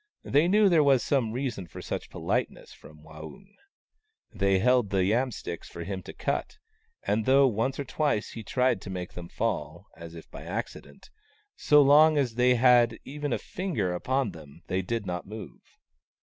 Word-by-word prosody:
They 150 +4 +2
knew 205 +2 +4
there 165 -5 +4
was 135 -3 +4
some 130 -6 0
reason 120 -7 -4
for - - -10
such - - -5
politeness - - -3
from 75 +1 -16
Waung. 80 - -12 0.8
So - - -15
they 95 0 +3
held 125 +1 +2
the 95 -2 +1
yam 120 +6 +1
sticks 85 -7 -7
for 85 - -7
him 95 +1 -5
to - - -10
cut, - - -3 0.5
and 105 +2 -1
though 135 +1 +6
once 125 +4 -1
or - - -1
twice 140 -4 -1
he 115 - -7
tried 130 +4 0
to - - -9
make 90 -1 -6
them 85 -1 -9
fall, 85 -5 -3
as 85 0 -11
if 80 - -11
by - - -9
acci - - -5
dent, 70 - -19 0.4
so 150 -1 +5
long 150 +2 +6
as 130 -5 0
they 125 +1 +3
had 120 -2 +4
even 145 +1 -5
a - - +1
finger 145 - -3
upon 130 +6 -1
them 80 +1 -14
they 95 +1 -1
did 115 +2 -3
not 90 -1 -5
move. 110 +1 -9
115 Hz, 190 wpm, -27 LUFS, 90-135 Hz, 0.8 s, though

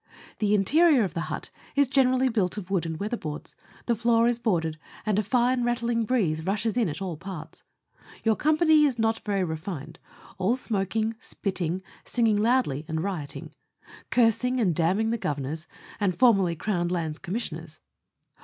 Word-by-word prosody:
The 210 -1 +3
interior 290 - +4
of 190 - -3
the 170 - -3
hut - - -4 0.2
is 285 -1 +4
gene 270 0 +4
rally 260 +1 +2
built 210 -6 0
of 195 -2 -6
wood 175 -4 +1
and 160 -1 -4
weatherboards; 200 -7 -4 0.3
the 240 - +2
floor 230 0 +3
is 240 -1 +1
boarded, 165 -9 0 0.3
and 210 -2 +2
a - - +1
fine 245 +3 +2
rattling 235 -1 0
breeze 180 -10 0
rushes 210 +5 -1
in 235 -7 +2
at 175 +6 -5
all 175 -5 -4
parts. 170 -2 -8 0.6
Your 220 -1 +3
company 310 +1 +4
is 265 -5 0
not 225 0 +1
very 200 -2 -1
refined 160 -1 -5 0.4
all 195 +6 +2
smoking, 220 -2 -1
spitting, 190 -6 -3 0.2
singing 225 -3 +2
loudly, 215 - +2
and 160 -1 -2
rioting; 175 -8 -5 0.6
cursing 250 +1 +2
and 190 -7 +2
damning 190 +8 +1
Governors, 160 - -3 0.3
and 190 -4 0
formerly 195 -9 +4
Crown 175 0 -1
Lands 165 -3 -2
Com 185 -1 -6
missioners. 160 -8 -5
205 Hz, 165 wpm, -26 LUFS, 170-235 Hz, 0.6 s, interior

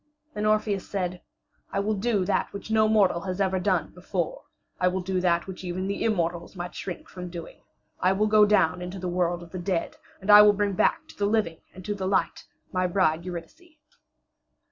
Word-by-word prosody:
Then 210 -2 -1
Orpheus 215 -2 0
said: 180 -2 -3 0.5
"I 195 - -1
will 210 +2 0
do 205 -2 0
that 200 - 0
which 200 +2 -7
no 220 0 +4
mortal 200 -5 +3
has 185 0 -4
ever 190 -1 +1
done 180 -4 0
before; 180 -1 -4 0.3
I 180 - +3
will 185 +1 0
do 185 0 -1
that 170 -1 +2
which 190 0 -8
even 180 +1 -3
the 200 +1 -2
immortals 170 -4 -1
might 175 0 -6
shrink 180 - -6
from 180 -1 -8
doing: 170 -1 -9 0.4
I 185 +1 +3
will 205 +2 +1
go 210 -1 +5
down 180 -4 +3
into 180 +2 -6
the 180 -1 -4
world 175 -1 0
of 170 - -14
the 185 - -5
dead, 175 -1 -2 0.2
and 200 +2 +1
I 210 0 +11
will 210 0 +7
bring 205 0 0
back - - +1
to - - -13
the 200 - 0
living 205 -7 0
and 185 -1 -12
to 210 - -1
the 190 -2 -3
light 195 - 0 0.2
my 185 0 +1
bride 170 -2 +1
Eurydice." 305 - -9
185 Hz, 210 wpm, -26 LUFS, 180-205 Hz, 0.5 s, I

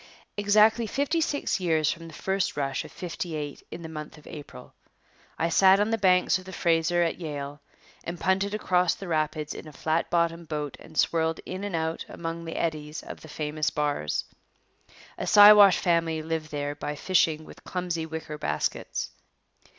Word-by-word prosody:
Exactly 215 +3 +4
fifty 285 +8 0
six 290 -8 0
years 160 -4 +2
from 165 0 -7
the 165 - -12
first 190 -5 -1
rush 135 -2 -1
of - - -12
'58 160 -4 -5
in 170 - -8
the - - -5
month 155 -1 -8
of 150 - -17
April, 145 - -10 0.6
I 165 - +1
sat 190 +2 +6
on 210 +2 +1
the - - +3
banks 185 -1 +4
of 185 - -13
the 190 - -8
Fraser 170 0 +2
at 170 - -1
Yale 145 -3 -6 0.4
and 170 0 -5
punted 195 +2 +1
across 180 -4 +2
the 195 - -8
rapids 155 -2 -1
in - - -9
a - - -9
flat 160 +3 -1
bottomed 170 -1 0
boat 150 -2 -4
and 160 - -13
swirled 160 -1 +2
in 185 +2 -5
and 205 -4 -3
out 160 0 -2
among 165 0 -5
the 165 - -6
eddies 155 -1 -3
of - - -9
the - - -11
famous 150 0 -2
bars. 145 - -1 0.9
A - - -3
Siwash 205 -1 +9
family 165 -2 +1
lived 160 -1 -3
there 145 -1 -3
by 145 0 -5
fishing 160 -1 +1
with - - -14
clumsy 175 -3 -3
wicker 160 -1 -6
baskets. 150 - -2
165 Hz, 175 wpm, -27 LUFS, 155-185 Hz, 0.9 s, Siwash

